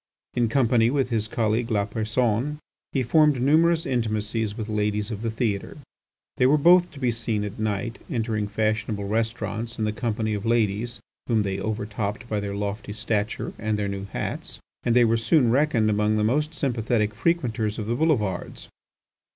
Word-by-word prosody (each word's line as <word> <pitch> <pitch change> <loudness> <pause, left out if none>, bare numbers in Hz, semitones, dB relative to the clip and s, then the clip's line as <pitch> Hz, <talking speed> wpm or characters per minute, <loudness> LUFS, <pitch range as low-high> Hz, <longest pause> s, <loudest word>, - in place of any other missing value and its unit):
In 120 -2 +1
company 120 -2 +3
with 135 -1 0
his 110 -2 0
colleague 115 +1 0
Lapersonne 110 +5 0 0.3
he 135 - 0
formed 150 +1 +4
numerous 160 +5 +3
intimacies 110 -2 -1
with 110 -2 -4
ladies 105 0 -1
of 105 -1 -5
the 115 - -1
theatre. 110 -3 -2 0.6
They 125 - +4
were 145 +3 +5
both 175 +4 +6
to 140 - -10
be 125 -3 +1
seen 115 -2 -2
at 105 +1 -6
night 110 +3 -2
entering 110 -6 -1
fashionable 110 0 -1
restaurants 115 +1 -2
in 110 - 0
the 105 - 0
company 110 -1 -2
of 100 -1 -3
ladies 115 0 0 0.3
whom 110 -3 +2
they 95 -1 -2
over 105 +1 -2
topped 105 +2 -4
by 105 -3 -1
their 100 -1 -4
lofty 105 +1 -4
stature 105 0 -2
and 110 -1 -1
their 105 -1 -1
new 100 0 -4
hats, 100 - -5 0.2
and 120 -1 +1
they 120 -1 +6
were 115 0 +3
soon 115 +2 +3
reckoned 130 -4 +3
amongst 105 0 +2
the 105 - +1
most 150 +8 +1
sympathetic 115 -5 0
frequenters 115 -9 0
of 110 - -3
the 115 - -1
boulevards. 120 - -1
110 Hz, 175 wpm, -25 LUFS, 105-120 Hz, 0.6 s, both